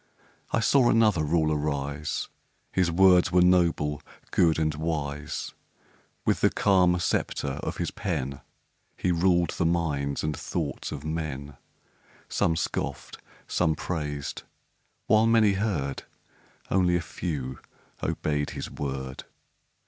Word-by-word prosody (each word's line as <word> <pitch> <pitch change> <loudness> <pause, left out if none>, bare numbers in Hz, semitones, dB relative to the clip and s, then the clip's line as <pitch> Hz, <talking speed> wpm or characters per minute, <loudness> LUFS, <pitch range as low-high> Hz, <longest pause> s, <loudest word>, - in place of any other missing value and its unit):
I - - +1
saw 125 +1 +4
another 110 -8 +4
Ruler 80 0 +2
rise 70 0 -2 0.4
His 90 -2 +2
words 90 0 +5
were 90 0 +5
noble, 85 -5 +2 0.3
good, 80 -3 +3
and 80 -1 +1
wise; 75 -2 -3 0.7
With - - +1
the - - +5
calm 90 -3 +3
sceptre 70 -4 -1
of - - -4
his - - -2
pen 70 +1 -3 0.6
He 90 - +1
ruled 85 -1 +3
the 85 - -1
minds 75 -5 0
and 75 0 -1
thoughts 80 -5 -4
of 75 -2 -6
men; 75 -3 -4 0.7
Some 80 - +1
scoffed, - - -3 0.3
some 80 -3 +1
praised 75 -5 -4 0.6
while 110 +1 +4
many 115 -2 +5
heard, 95 -10 -1 0.7
Only 90 -2 +3
a - - +2
few 70 -6 -4 0.4
obeyed 75 -1 -1
his - - -5
word. 65 -2 -5
80 Hz, 120 wpm, -27 LUFS, 75-90 Hz, 0.7 s, words